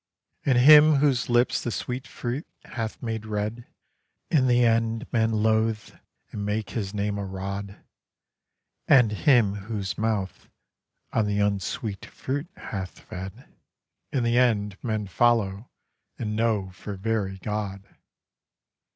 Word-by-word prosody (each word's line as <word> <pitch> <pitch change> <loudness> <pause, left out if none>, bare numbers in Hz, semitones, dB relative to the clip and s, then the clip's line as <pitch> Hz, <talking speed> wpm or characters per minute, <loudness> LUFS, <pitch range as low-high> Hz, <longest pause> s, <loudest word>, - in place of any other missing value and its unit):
And 130 -3 +3
him 150 +4 +8
whose 140 -4 +2
lips 120 +1 +3
the - - -3
sweet 125 +2 -4
fruit 125 +5 -4 0.2
hath 115 -1 -5
made 115 -2 -3
red 110 +2 -4 0.6
In 135 -5 +4
the 125 -1 +4
end 115 +1 +1
men 115 -2 +3
loathe 110 0 +1 0.4
and 105 - -4
make 105 0 -2
his 100 -4 -3
name 100 0 -2
a - - -3
rod; 100 +1 -6 1.0
And 125 -6 +6
him 110 -2 +3
whose 100 -1 -4
mouth 105 -4 -2 0.6
on 110 -2 +2
the 105 0 0
unsweet 100 0 -2
fruit 145 +5 -4
hath 95 -3 -6
fed 95 +1 -9 0.6
In 130 -4 0
the 120 +1 +3
end 105 -5 +2
men 110 -3 -1
follow 110 0 +1 0.5
and 105 -2 -3
know 110 -4 0
for 100 +2 -7
very 100 -1 -2
God. 100 -1 -4
110 Hz, 130 wpm, -26 LUFS, 100-120 Hz, 1.0 s, him